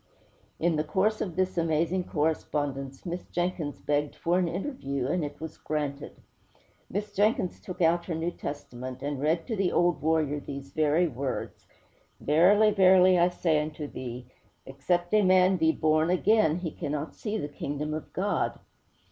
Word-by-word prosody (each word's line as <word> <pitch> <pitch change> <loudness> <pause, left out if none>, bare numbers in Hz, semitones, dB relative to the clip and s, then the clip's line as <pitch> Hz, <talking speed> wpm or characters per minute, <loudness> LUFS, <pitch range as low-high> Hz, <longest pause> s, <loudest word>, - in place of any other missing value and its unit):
In 165 -1 +1
the 155 - +1
course 190 +8 0
of 180 -5 -3
this 185 -1 0
amazing 165 +3 0
correspondence, 145 -3 -2
Miss 175 0 -4
Jenkins 175 -4 -2
begged 145 0 -1
for 175 +2 +1
an 180 - +1
interview, 165 - -3
and 170 +5 0
it 145 0 -6
was 160 0 -8
granted. 145 -2 -4 0.7
Miss 205 +1 -4
Jenkins 205 -3 +1
took 180 -1 -4
out 170 +1 +3
her 170 - -3
New 165 +2 -2
Testament 130 -4 -7
and 145 -1 -3
read 160 +3 +1
to 225 - -3
the 195 -3 +1
old 175 -4 +2
warrior 155 -1 +1
these 140 -1 -8
very 155 +3 +2
words. 135 -2 -5 0.5
'_Verily, 200 +8 +4
verily, 185 -1 +6
I 175 +1 +4
say 165 -4 +1
unto 150 0 -5
thee, 125 -3 -7 0.4
except 175 +7 -1
a 215 - +6
man 185 0 +4
be 160 -1 +3
born 155 +1 +2
again, 185 -2 +3
he 175 -2 -4
cannot 150 -1 -4
see 215 -1 -4
the 145 - -3
Kingdom 145 +1 -4
of 155 - -6
God! 200 +2 -1
160 Hz, 165 wpm, -28 LUFS, 145-185 Hz, 0.7 s, verily